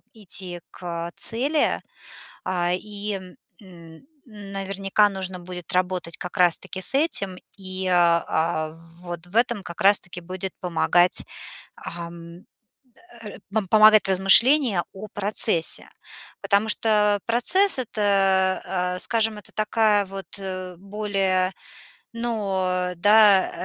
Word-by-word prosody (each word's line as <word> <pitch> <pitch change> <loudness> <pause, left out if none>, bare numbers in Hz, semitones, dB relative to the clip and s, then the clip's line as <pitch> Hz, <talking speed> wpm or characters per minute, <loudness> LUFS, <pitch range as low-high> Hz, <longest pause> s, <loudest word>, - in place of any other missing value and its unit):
идти 185 -4 -6
к 170 -1 -7
цели. 280 +7 +1 0.7
А, 175 -1 -1
и 205 +2 -5 0.5
н 170 +1 -16 0.2
наверняка 195 -2 -2
нужно 190 -2 -6
будет 180 0 -8
работать 180 -2 -2
как 180 - -8
раз 175 -2 +3
таки 190 - -8
с 190 - +3
этим. 200 - +1 0.2
И, 185 -1 -5
а, 170 -2 +1 0.3
вот 175 -1 -8
в 175 - -13
этом 235 -4 +2
как 175 +4 -9
раз 200 0 +5
таки 180 0 -10
будет 185 +1 -5
помогать, 175 0 +1 0.5
ам, 170 +1 -10 0.8
р 210 - -9 0.3
помогать 215 -1 +6
размышление 195 - +5
о 200 +2 -9
процессе. 200 -4 +3 0.5
Потому 205 +2 +1
что 210 -2 +2
процесс- 280 +11 +3
это, 195 -5 +1 0.3
э, - - -6
скажем, 225 +1 +1
это 205 - -14
такая 215 -1 +1
вот, 195 0 -8
э, 185 -2 -6
более, 195 -2 -1 0.6
ну 190 -6 -2
да, 205 +1 +5
195 Hz, 110 wpm, -23 LUFS, 180-210 Hz, 0.8 s, помогать